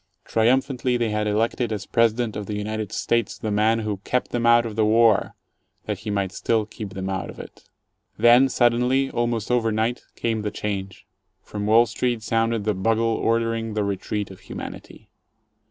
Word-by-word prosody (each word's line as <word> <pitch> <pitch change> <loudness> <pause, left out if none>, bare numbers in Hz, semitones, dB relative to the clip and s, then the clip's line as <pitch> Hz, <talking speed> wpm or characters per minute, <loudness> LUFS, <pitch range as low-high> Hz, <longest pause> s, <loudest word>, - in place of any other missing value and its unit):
Triumphantly 125 +2 +1
they 115 -2 0
had 105 0 -1
elected 115 +2 0
as 105 -2 -3
President 115 0 +1
of 105 -1 -5
the 105 - -3
United 110 0 -4
States 115 -3 -1
the 110 - -4
man 110 +2 +2
who 105 -2 -3
"kept 125 +6 -2
them 120 -1 0
out 120 0 +5
of 110 -2 -5
the 110 - +2
war" 110 0 +3 0.5
that - - -3
he 110 - -6
might 100 -2 -1
still 110 +3 0
keep 105 -1 -8
them 95 0 -4
out 95 -1 -3
of - - -10
it. - - -12 0.5
Then 120 +4 +6
suddenly, 125 +2 +2
almost 120 -1 -1
over 115 -2 +2
night, 110 +3 -1
came 115 -2 -1
the 105 - -2
change. 95 -4 -5 0.4
From 105 0 -5
Wall 115 +2 +6
Street 120 +1 -2
sounded 115 0 0
the 105 0 +1
bugle 115 +4 +1
ordering 115 -1 -1
the 105 - +1
retreat 100 +1 -3
of 95 - -12
Humanity. - - -9
110 Hz, 180 wpm, -23 LUFS, 105-120 Hz, 0.5 s, Then